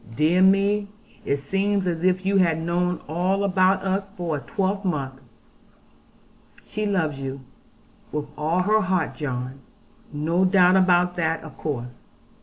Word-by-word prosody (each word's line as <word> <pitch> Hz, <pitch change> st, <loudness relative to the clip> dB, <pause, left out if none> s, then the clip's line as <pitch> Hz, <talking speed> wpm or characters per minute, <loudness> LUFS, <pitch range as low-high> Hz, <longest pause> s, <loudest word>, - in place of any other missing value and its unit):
Dear 160 Hz, +6 st, +3 dB
me, 200 Hz, +2 st, +3 dB, 0.4 s
it 140 Hz, -, +1 dB
seems 195 Hz, +7 st, -1 dB
as 170 Hz, -2 st, -2 dB
if 185 Hz, 0 st, +1 dB
you 195 Hz, +1 st, +2 dB
had 165 Hz, -4 st, +3 dB
known 175 Hz, +2 st, -1 dB
all 180 Hz, +5 st, 0 dB
about 190 Hz, 0 st, +2 dB
us 195 Hz, +1 st, -1 dB
for 170 Hz, -3 st, -2 dB
a -, -, -3 dB
twelvemonth.' 185 Hz, -9 st, -2 dB, 1.4 s
'She 215 Hz, 0 st, -3 dB
loves 160 Hz, -8 st, -1 dB
you, 135 Hz, 0 st, -5 dB, 0.7 s
with 150 Hz, -1 st, -3 dB
all 160 Hz, +4 st, 0 dB
her 215 Hz, +3 st, +3 dB
heart, 185 Hz, -3 st, 0 dB
John. 130 Hz, -2 st, -5 dB, 0.5 s
No 160 Hz, +5 st, 0 dB
doubt 185 Hz, -1 st, +5 dB
about 180 Hz, -1 st, +3 dB
that 165 Hz, -1 st, -1 dB
of 155 Hz, -4 st, -11 dB
course.' 125 Hz, -5 st, -5 dB
180 Hz, 140 wpm, -24 LUFS, 155-195 Hz, 1.4 s, doubt